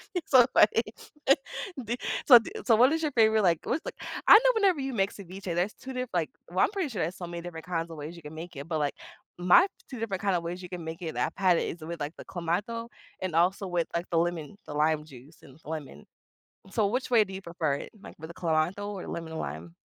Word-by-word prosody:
You 360 - +1
so 255 -3 +7
funny. 225 +2 +5 1.0
D 235 +3 -2 0.3
so, 245 -4 +11
d 225 - -8
so, 230 - +5
what 250 +5 +6
is 320 - 0
your 305 - 0
favorite, 220 -2 +4
like 170 -4 +3
what's 315 - -1
like - - -5 0.3
I - - +10
know - - +7
whenever 390 -7 +3
you 270 0 -3
mix 195 -3 0
ceviche, 195 0 -10
there's 180 +5 0
2 265 - -9
diff 255 -1 -3
like, 170 -3 0 0.2
well, 180 +2 -3
I'm - - +2
pretty 385 -7 -2
sure 210 -8 -3
there's 170 +4 -3
so 175 - -6
many 170 0 -6
different 165 -2 -8
kinds 165 -1 -2
of 165 - -8
ways 150 +3 -7
you 170 - -12
can 150 +1 -9
make 170 +2 -8
it, 140 +2 -7
but, 160 -2 -1
like, 145 -1 0 0.5
my 180 - +6 0.2
2 255 - -7
different 200 -5 -3
kinda 195 -3 +2
ways 175 +2 -5
you 180 - -8
can 180 -2 -6
make 165 +2 -6
it 160 -3 -5
I've - - 0
had 185 -3 +4
it, - - -1
is 170 - -8
with, 165 +1 -6
like, 145 +2 -3
the - - -10
clamato 195 +7 -2 0.3
and 185 -3 -2
also 185 +4 +2
with, 175 -2 0
like, 170 +1 -1
the 170 - +2
lemon 170 +2 -1
the - - -6
lime 150 +1 +2
juice 140 +2 -14
and 135 +3 -16
lemon. 145 - -7 0.7
So, 215 -1 +2
which 250 +6 -2
way 230 -3 +6
do 190 - -10
you 190 - -6
prefer 170 -5 -1
it? - - -7
Like, - - -11
with 160 - -7
the - - -8
clamato 170 +4 0
or 200 -3 -6
lemon 165 -1 -5
lime? 80 - -6
175 Hz, 250 wpm, -28 LUFS, 160-215 Hz, 1.0 s, so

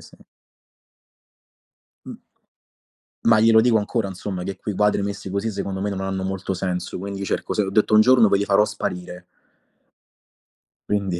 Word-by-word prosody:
sì. - - -17 1.9
Mh. - - -9 1.0
Ma 115 -1 +5
glielo 110 0 +6
dico 115 -1 +3
ancora 105 0 -1
insomma 95 -1 -6
che 95 +1 -5
quei 105 - -5
quadri 105 0 +2
messi 100 -1 -5
così 100 +4 -2
secondo 100 -1 -4
me 105 - -1
non 95 - -4
hanno 95 0 -3
molto 95 0 -3
senso, 90 -1 -3
quindi 100 +1 -6
cerco - - -2
se 105 - +1
ho 95 - -4
detto: 105 +1 +1
"Un 110 - +7
giorno 120 -1 +5
poi 100 - +3
li 100 - 0
farò 100 +1 +4
sparire". 90 -4 -5 1.6
Quindi 100 -4 -1
100 Hz, 160 wpm, -22 LUFS, 95-105 Hz, 1.9 s, Un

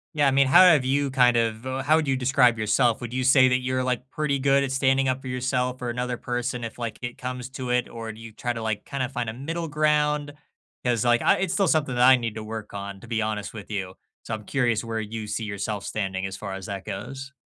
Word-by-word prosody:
Yeah, 145 -2 +3
I 135 - +4
mean, 135 0 +4
how 175 +8 +8
have 160 -7 +6
you 140 +2 +1
kind 125 -2 +4
of 115 +1 -1
uh, 130 +1 -3
how 155 +3 +4
do 145 -3 -1
you 135 - +1
describe 125 -2 +3
yourself? 115 +2 +2
Would 120 -1 -7
you 130 0 -1
say 130 0 +6
that 125 0 +2
you're 130 0 -1
like 125 +1 -2
pretty 145 -1 -1
good 140 +1 +3
at 135 -1 -1
standing 135 0 +2
up 130 0 0
for 130 - -7
yourself 125 0 -1
or 120 - -2
another 125 +1 -2
person 125 0 -3
if, 115 - -8
like, 115 -3 -5
it 120 0 -5
comes 125 0 -5
to 130 -1 -5
it? 125 0 +1
Or 115 -1 -7
do 110 - -13
you 115 -1 -10
try 120 +3 -3
to, 115 -1 -4
like, 110 -2 -2
kinda 130 -2 -3
find 125 -3 -3
a - - -5
middle 165 +6 -4
ground? 150 -1 +1 0.5
'Cause 120 -2 +1
like, 120 -1 +4
I - - +4
It's 190 -2 -1
still 195 -1 +2
something 150 -5 +1
that 120 - +3
I 130 0 +8
need 115 -3 -4
to 110 - -5
work 110 -1 -7
on, 100 -1 -6
to 115 - -13
be 115 -1 -1
honest 105 -1 -3
with 110 -1 -9
you. 95 -3 -3 0.3
So - - -5
I'm 110 -1 -4
curious 120 -2 0
where 115 -1 -3
you 110 0 -5
see 105 +2 -3
yourself 100 0 -4
standing 95 -3 -3
as 95 0 -5
far 100 -2 -6
as 95 -1 -7
that 100 -1 -5
goes. 135 +7 -6
125 Hz, 265 wpm, -25 LUFS, 110-135 Hz, 0.5 s, how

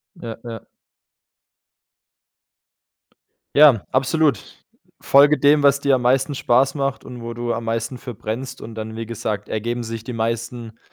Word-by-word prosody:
Ja, 115 -9 -7
ja. 115 -3 -7 3.0
Ja, 140 -8 +6
absolut. 140 +3 +2 0.6
Folge 145 +2 +5
dem, 145 +1 +4
was 140 0 +4
dir 140 -2 +3
am 125 - -3
meisten 135 +3 +2
Spaß 135 +3 +2
macht 140 -1 -2
und 125 -1 -9
wo 115 0 -6
du 120 0 -2
am 115 0 -4
meisten 115 +2 -3
für - - -21
verbrennst 130 +6 -6
und 115 0 -9
dann, 110 0 -6
wie 115 -1 -5
gesagt, 105 -2 -4
ergeben 120 +3 -3
sich 115 -1 -6
die 125 - -6
meisten 115 0 -4
120 Hz, 150 wpm, -21 LUFS, 115-135 Hz, 3.0 s, Ja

